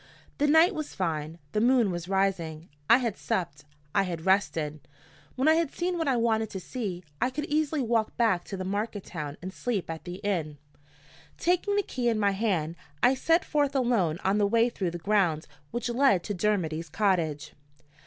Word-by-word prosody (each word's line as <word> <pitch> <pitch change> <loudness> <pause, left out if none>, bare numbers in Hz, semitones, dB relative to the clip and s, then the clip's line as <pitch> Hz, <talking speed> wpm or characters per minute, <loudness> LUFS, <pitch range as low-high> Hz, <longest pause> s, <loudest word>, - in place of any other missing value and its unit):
The 295 - +3
night 320 +6 +6
was 310 -3 -5
fine, 160 -3 -2
the 210 - 0
moon 240 -4 +4
was 175 0 -5
rising. 180 -5 -1 0.2
I 235 - +8
had 240 -4 -1
supped; 150 -5 -3 0.3
I 200 - +4
had 170 -4 -4
rested. 165 -6 +1 0.6
When 260 +3 +1
I 315 - +7
had 325 -3 +1
seen 355 +1 -2
what 325 - -1
I 260 -3 +2
wanted 225 -2 +1
to 190 - -5
see, 185 -2 -5 0.2
I 250 - +3
could 295 +3 -4
easily 305 -1 0
walk 225 -2 0
back 220 -7 +2
to 195 - -6
the 185 - -4
market 205 +1 -2
town 150 -4 -6
and 185 +1 -5
sleep 210 -9 -2
at 160 - -7
the 175 0 -5
inn. 165 -7 -1 0.8
Taking 360 +4 +1
the 410 - +2
key 245 -8 -1
in 225 - +1
my 200 -1 +3
hand, 185 -6 -1 0.3
I 250 - +6
set 330 +6 +2
forth 290 -2 0
alone 230 - +2
on 195 +2 +2
the 205 - +3
way 230 +3 +3
through 190 -6 -2
the 170 - -5
grounds 175 -4 +1 0.2
which 240 +6 -3
led 240 -7 +3
to 205 - -3
Dermody's 170 -5 -1
cottage. 170 -6 0
205 Hz, 195 wpm, -28 LUFS, 175-250 Hz, 0.8 s, I